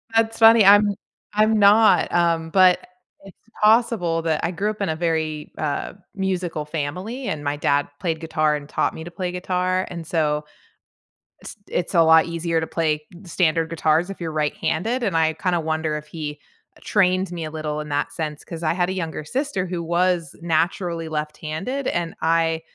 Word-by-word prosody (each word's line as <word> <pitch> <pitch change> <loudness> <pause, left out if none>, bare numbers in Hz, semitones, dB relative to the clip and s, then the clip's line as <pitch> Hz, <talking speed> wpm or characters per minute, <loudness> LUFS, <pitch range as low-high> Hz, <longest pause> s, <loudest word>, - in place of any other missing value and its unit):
That's 225 0 +2
funny, 225 -2 +7
I'm 205 +1 +7 0.5
I'm 215 +1 +3
not, 210 +2 +5
um, 165 -2 +1
but, 185 -2 +6
eh, - - -16 0.4
it's - - -19 0.3
possible 215 -7 +3
that 160 -2 0
I 170 - 0
grew 200 +5 -1
up 215 -1 -6
in 195 - 0
a 160 - -1
very, 160 -2 -2
uh, 150 -2 -3 0.2
musical 185 -5 -2
family, 180 - -4
and 150 -1 -3
my 145 0 -1
dad 145 0 +1
played 165 -3 -2
guitar 155 -2 0
and 145 0 -7
taught - - 0
me 160 - -8
to 175 - -8
play 180 0 -4
guitar, 185 +1 -1
and 170 -2 -7
so 150 -2 0 1.0
it's - - -9
it's 175 +2 -3
a 170 - +5
lot 160 0 +6
easier 165 -1 -1
to 160 - -3
play 155 -2 0 0.2
standard 165 -2 +1
guitars 165 +2 +1
if 195 - -8
you're 165 -1 -3
right-handed, 160 - -1
and 190 -7 0
I 160 0 +2
kinda 175 +1 -1
wonder 160 -1 -1
if 150 0 -9
he, 150 -2 -6 0.4
eh, - - -19
trained 185 -2 +2
me 170 -2 -5
a 155 - -5
little 155 -1 -4
in 150 - -8
that 145 0 -2
sense 150 -1 -5
'cause 165 -1 -7
I 155 - +2
had 175 0 0
a 190 - -2
younger 160 -4 -4
sister 255 - -2
who 175 -2 -4
was 170 -2 0
naturally 170 0 -1
left-handed, 155 - -4
and 170 -1 -2
I 165 0 +1
165 Hz, 185 wpm, -22 LUFS, 155-185 Hz, 1.0 s, funny